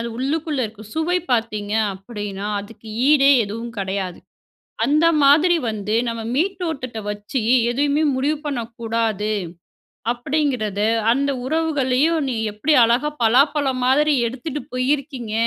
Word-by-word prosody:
அது 235 - -3
உள்ளுக்குள்ளே 290 +1 -1
இருக்க 215 0 -12
சுவை 330 +3 +1
பார்த்தீங்க 215 -3 -1 0.2
அப்பிடின்னா, 205 0 -6
அதுக்கு 220 +2 -13 0.2
ஈடே 280 -2 +6
எதுவும் 230 +3 -6
கிடையாது. 190 -2 -3 0.7
அந்த 305 +3 +3 0.2
மாதிரி 310 +5 +5
வந்து 210 0 -3
நம்ம 230 0 -3
மேல்த்தோற்றத்த 320 - -2
வச்சு 210 +5 -4 0.3
எதையுமே 285 +4 +1
முடிவு 285 +4 0
பண்ணக்கூடாது. 230 -4 -2 0.8
அப்பிடிங்கிறது 245 -6 -1 0.3
அந்த 280 +2 0
உறவுகளையும், 305 0 +1
நீங்க 230 -4 -2
எப்பிடி 270 +9 +1
அழகா 240 +6 +2
பலாப்பழ 275 +5 +3 0.2
மாதிரி 295 +4 +3
எடுத்துட்டு 265 +5 -5
போயிருக்கீங்க? 255 -2 -2
255 Hz, 115 wpm, -21 LUFS, 220-295 Hz, 0.8 s, ஈடே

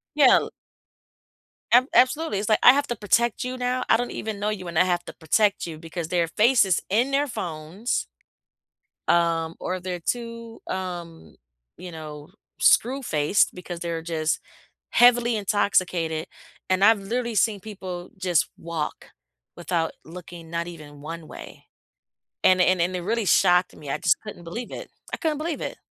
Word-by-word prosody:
Yeah, 280 -4 +7
l - - -5 1.2
Ab 245 +2 +6
absolutely, 260 -3 +3
it's 205 - -3
like, 215 - +4
"I 250 - +10
have 285 +1 0
to 240 - -2
protect 230 +2 +1
you 255 +1 -4
now, 250 0 -1
I 225 - +6
don't 245 +1 -3
even 215 -2 -5
know 210 +1 0
you, 190 -4 -4
and 170 -1 -4
I 180 - +6
have 175 -1 0
to - - -8
protect 200 +6 +1
you 165 -2 -7
because 165 +1 -6
their 175 -2 +1
faces 210 0 +3
in 235 +8 +2
their 285 +1 +2
phones" 175 - -3 1.0
um, 165 -1 +2
or 185 +1 -3
they're 180 -1 -4
too, 230 +3 -5
um, 175 - -6 0.4
you 180 +1 -8
know, 150 -2 -9 0.3
screw-faced 215 - +3
because 180 -1 -7
they're 170 -1 -3
just 160 -1 -1 0.5
heavily 240 -1 +5
intoxicated, 185 -6 0 0.4
and 185 +1 +2
I've 220 0 +6
literally 235 +3 -3
seen 210 +1 +2
people 185 -3 -7
just 180 -4 +1
walk 165 -2 -5 0.5
without 170 -1 -1
looking 170 0 -11
not 170 0 -2
even 150 -4 -11
one 165 +1 -7
way. - - -11 0.8
And 185 0 +5
it - - +6
and 185 -1 +2
and 180 +2 +1
it - - -3
really 220 +3 -1
shocked 180 0 +4
me, 145 -2 -9
I - - 0
just - - +3
couldn't 210 -5 -9
believe 230 +9 -6
it, - - -8 0.2
I - - -1
couldn't 310 -3 -1
believe 315 0 -3
it. - - -5
185 Hz, 165 wpm, -24 LUFS, 170-230 Hz, 1.2 s, I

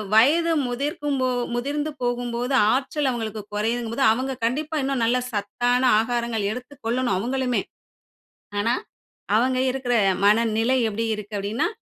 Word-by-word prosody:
வயது 315 +9 +5 0.2
முதிர்க்கும் 285 +3 -2
போ 255 - +2 0.3
முதிர்ந்து 290 +5 -2
போகும்போது 245 +1 -1 0.2
ஆற்றல் 275 +2 0
அவுங்களுக்கு 220 -3 -4
குறையுதுங்கம்போது 230 +4 -1
அவுங்க 260 +4 -1
கண்டிப்பா 300 +7 -1
இன்னும் 265 -3 0
நல்ல 240 +2 +2
சத்தான 245 +4 0 0.2
ஆகாரங்கள் 235 -2 -1
எடுத்துக் 250 +4 -9
கொள்ளணும், 245 -3 +1
அவுங்களுமே! 250 +4 0 1.0
ஆனா, 230 +4 +2 0.6
அவுங்க 255 +3 +2
இருக்கிற 250 -2 -1 0.3
மனநிலை 225 +3 +3
எப்பிடி 220 +2 -2
இருக்கு? 210 0 -9
அப்பிடின்னா, 200 +3 -1
245 Hz, 120 wpm, -24 LUFS, 225-265 Hz, 1.0 s, வயது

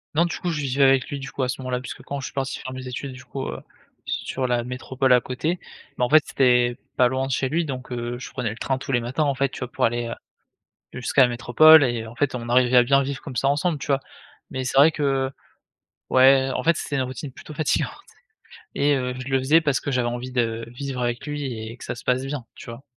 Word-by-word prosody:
Non, 170 +3 +4
du 170 - -3
coup, 180 - -2
je 155 -3 -2
vivais 140 0 +1
avec 135 -1 +3
lui, 140 - -4
du 135 0 -7
coup, 135 - -2
à 125 - -1
ce 130 - -3
moment-là. 130 -1 -2
Puisque 130 - -8
quand 140 - -5
je 135 - -5
suis - - -7
parti 135 -1 -3
faire 130 - -7
mes 130 0 -7
études, 130 +2 -5
du 130 - -11
coup, 135 -1 -5
heu, - - -5 0.5
sur 130 -1 -2
la 120 -1 +1
métropole 130 +1 -1
à 125 - +5
côté, 155 +9 -2 0.4
bah, 125 - +2
en - - -4
fait, 155 0 +6
c'est 125 -2 +3 0.2
pas 125 - +5
loin 130 +2 -1
de - - -4
chez 130 +1 0
lui. 165 +4 0
Donc, 130 -3 -6
heu, 120 0 -3
je 125 - -8
prenais 125 -4 -2
le 105 - -6
train 135 +2 -1
tous 135 +1 -6
les 120 -2 +2
matins, 125 +6 -1
en 140 -2 +1
fait, 135 +1 +1
tu - - -9
vois? 125 -1 -5
Pour - - +1
aller, 120 +1 0
heu, 115 - -4 0.8
jusqu'à 125 +2 +2
la 125 - +5
métropole 145 +6 +6
et 120 -3 -1
heu, 115 - -9
en 115 - -11
fait, 140 +1 0
on 120 -1 -5
arrivait 125 +1 +4
à 125 - +8
bien 135 +3 +3
vivre 140 0 -4
comme 130 - -8
ça 135 - +2
ensemble, 150 +3 +1
tu - - -7
vois? 140 -1 +2 0.5
Mais 130 - -4
c'est 130 +1 -2
vrai 145 +4 +7
que 135 -3 0 0.8
ouais, 130 +1 +5
en - - -2
fait, 165 +1 +3
c'était 145 - -3
une 135 - +1
routine 130 +2 -6
plutôt 150 - -11
fatigante 155 +1 0 0.8
et, 145 +1 +3
heu, 125 -1 -2
je 130 0 -6
le 135 -1 +2
faisais 145 +5 +4
parce 145 -5 0
que - - -4
j'avais 125 -2 +1
envie 120 +2 -4
de 115 -2 -1
vivre 130 +1 -5
avec 120 +2 -2
lui 145 -1 -4
et 115 -3 -5
que - - -11
ça - - -4
se 120 - -12
passe 125 +1 +1
bien, 135 -3 -4
tu - - -12
vois? 115 +3 -9
130 Hz, 270 wpm, -23 LUFS, 125-140 Hz, 0.8 s, à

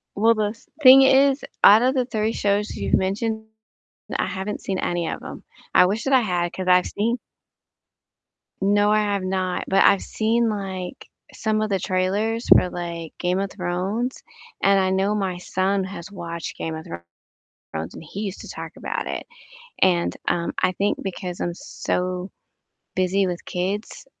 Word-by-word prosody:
Well, 225 +3 +4
the 210 0 0 0.3
thing 265 0 +10
is, 270 +1 +4 0.2
out 215 +3 +9
of 255 +1 +3
the 255 -2 +1
3 220 -2 -1
shows 205 +1 0
you've - - -3
mentioned, 220 +3 -2 0.7
I - - 0
haven't 195 +2 -4
seen 190 -1 -2
any 175 -1 -1
of - - -4
them. - - -9 0.3
I - - +7
wish 205 +5 -1
that 275 - 0
I 260 - +6
had, 175 -4 -1
'cause 185 - -5
I've 180 0 +5
seen 230 +4 -1 1.4
No, 205 +1 +3
I 215 - +4
have 205 -2 0
not. 185 -1 -1
But, 195 - +4
I've 200 - +5
seen, 225 +1 +1
like, 195 0 -5 0.3
some 215 -1 0
of 215 - -1
the 195 -2 +1
trailers 205 +5 -1
for, 180 - +6
like, 170 -2 -6
"Game 180 +1 0
of 195 0 -2
Thrones," 195 +7 -3 0.4
and 195 0 +5
I 190 - +2
know 190 +2 +1
my 190 -4 -1
son 190 +2 0
has 190 0 -8
watched 170 -3 -6
"Game 160 -1 -4
of 160 - -8 0.7
Thrones," 80 0 -8
and - - -9
he 195 +6 -7
used 200 -3 -4
to - - -10
talk - - -7
about - - -4
it. - - -4 0.5
And, 175 -2 +2
um, 170 -1 0
I 185 - +3
think 200 +3 -1
because 180 -2 -5
I'm 175 - -1
so 180 +1 -3 0.7
busy 185 +1 +2
with 175 -1 -4
kids 195 - -3
195 Hz, 170 wpm, -23 LUFS, 180-215 Hz, 1.4 s, thing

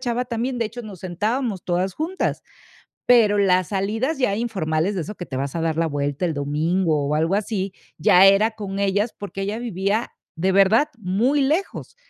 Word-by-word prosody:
chava 245 -1 -1
también, 245 +1 -3
de 230 - 0
hecho, 235 +3 -6
nos 200 -5 -10
sentábamos 205 +4 -2
todas 180 +1 -1
juntas. 335 +5 -2 0.6
Pero 225 -4 +5
las 185 -3 +2
salidas 220 +10 -1
ya 250 -7 +1
informales, 190 -6 -1
de 180 - -1
eso 210 +6 -6
que 180 - -7
te 130 - -5
vas 135 +2 -3
a 165 - -1
dar 160 -1 -1
la 165 - +2
vuelta 145 +2 -2
el 165 - -1
domingo 155 +2 0
o 150 - 0
algo 165 +5 +1
así, 200 -2 -2 0.3
ya 180 +4 +6
era 195 +3 +5
con 200 -3 -6
ellas, 200 +3 0
porque 200 -1 -6
ella 205 +3 -3
vivía, 210 -1 -1 0.2
de 185 +3 +1
verdad, 200 +9 +4
muy 225 +8 +1
lejos. 310 +8 -1
195 Hz, 190 wpm, -22 LUFS, 175-230 Hz, 0.6 s, ya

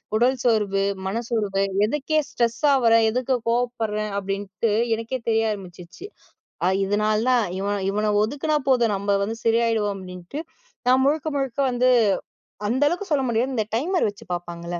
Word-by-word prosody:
உடல் 245 +4 +3
சோர்வு, 210 -4 +2 0.2
மனச்சோர்வு, 210 -2 -1 0.2
எதுக்கு 295 +6 -1
ஸ்ட்ரெஸ்ஸா 235 +5 +1
ஆவுர? 230 -3 +3 0.2
எதுக்கு 255 +3 0
கோபப்படுறேன், 225 -3 -1
அப்டின்னு 195 +2 -2 0.2
எனக்கே 230 +3 -4
தெரிய 225 -1 +2
ஆரம்பிச்சுச்சு. 180 - -9 0.6
அ - - +4 0.2
இதனாலதான், 215 +4 +2
இவன் 200 0 -1
இவன 210 +1 0
ஒதுக்குனா 290 +6 0
போதும், 235 -5 +3
நம்ம 200 +1 0
வந்து 225 +3 -3
சரியாயிடுவோம் 225 -3 +2
அப்டின்ட்டு. 180 - -7 0.5
நான் 260 +1 +5
முழுக்க 300 +2 +1
முழுக்க 270 -2 -3
வந்து, 250 +1 +2 0.8
அந்த 260 +5 +1
அளவுக்கு 360 +4 -4
சொல்ல 280 -2 +2
முடியாது, 240 +4 0
இந்த 220 - 0
டைமர் 345 - +1
வச்சு 200 - -12
பாப்பாங்கல்ல 175 0 -5
225 Hz, 140 wpm, -23 LUFS, 200-255 Hz, 0.8 s, நான்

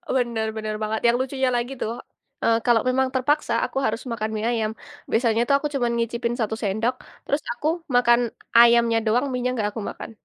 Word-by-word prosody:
Bener 235 -3 0
bener 215 0 -3
banget 215 +1 -2
yang 235 - +4
lucunya 265 0 0
lagi 240 +3 -2
tuh, 230 +2 -2 0.5
eee, 230 0 +4
kalau 235 -3 +4
memang 265 +1 +2
terpaksa 260 -1 +1
aku - - -6
harus 225 +2 -1
makan 220 -1 -2
mie 215 +1 -2
ayam. 220 -2 0 0.4
Biasanya 230 -1 +2
tuh 280 - +5
aku 295 - -2
cuman 240 -3 +1
nyicipin 235 +1 -1
satu 220 -2 -1
sendok, 220 +5 0 0.3
terus 285 +1 0
aku 270 +6 -3 0.3
makan 240 -1 +5 0.4
ayamnya 235 -1 +6
doang, 240 +5 +2
mienya 250 0 -1
nggak 210 -3 0
aku 225 - -5
makan. - - -8
235 Hz, 185 wpm, -23 LUFS, 220-250 Hz, 0.5 s, ayamnya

